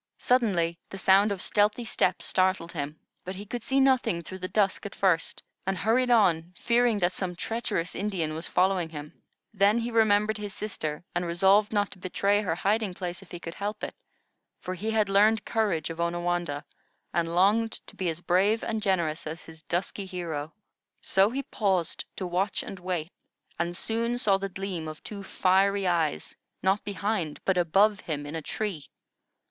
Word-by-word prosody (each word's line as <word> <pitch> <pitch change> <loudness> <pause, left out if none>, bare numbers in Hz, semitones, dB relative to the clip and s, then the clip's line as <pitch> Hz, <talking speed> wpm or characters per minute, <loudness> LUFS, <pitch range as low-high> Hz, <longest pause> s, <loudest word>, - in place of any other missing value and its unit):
Suddenly, 180 -9 +2
the 195 - -7
sound 195 +2 +5
of 195 -2 -1
stealthy 210 +3 +2
steps - - +1
startled 185 -2 +1
him, 150 -1 -5 0.2
but 185 +1 -6
he 200 +2 -7
could 240 +4 -5
see 265 +4 +1
nothing 250 -10 +3
through 185 +3 -8
the 185 - -3
dusk 200 -1 +1
at 205 - -7
first, 185 -4 +1 0.2
and 195 -1 0
hurried 235 +6 +2
on, 180 -7 +3
fearing 235 -1 +3
that 180 -2 +1
some 180 -2 -3
treacherous 200 -4 -2
Indian 185 -6 -2
was 160 +2 -2
following 180 -2 +2
him. 150 -1 -9 0.3
Then 200 +2 +4
he 235 +1 -2
remembered 215 -1 +3
his 205 -2 -5
sister, 155 -8 -4
and 175 - 0
resolved 190 +5 +3
not 205 -2 +1
to - - -12
betray 200 +3 +1
her 170 -5 -1
resting 205 -2 +1
place 175 0 -5
if 195 - -16
he 175 - -7
could 165 -1 -7
help 205 +2 -4
it, - - -3 0.7
for 185 - -5
he 205 +5 -3
had 220 -2 +2
learned 210 +2 +4
courage 195 -9 0
of 165 - -8
Onawandah, 175 -3 -1 0.5
and 170 0 0
longed 215 +5 +3
to - - -11
be 185 -2 -1
as 165 +1 -3
brave 195 +6 +2
and 220 -1 -2
generous 170 -7 0
as 160 +2 -6
his 160 -1 -12
dusky 190 +4 -3
hero. 165 -5 -4 0.5
So 195 +2 +4
he 270 +4 -3
paused 190 -9 0
to 185 - -4
watch 185 +3 -1
and 195 - -8
wait, 175 -2 -3 0.5
and 170 +1 -1
soon 230 +3 0
saw 205 -6 +3
the 195 0 -3
gleam 185 -4 -4
of 155 0 -8
two 205 -2 -7
fiery 195 +1 +2
eyes, 165 - 0 0.3
not 190 +2 +2
behind, 200 -5 -2
but 190 - +3
above 195 +5 +3
him, 150 -5 -4
in 145 - -7
a 160 - -3
tree. 175 -4 -4
190 Hz, 185 wpm, -27 LUFS, 170-210 Hz, 0.7 s, sound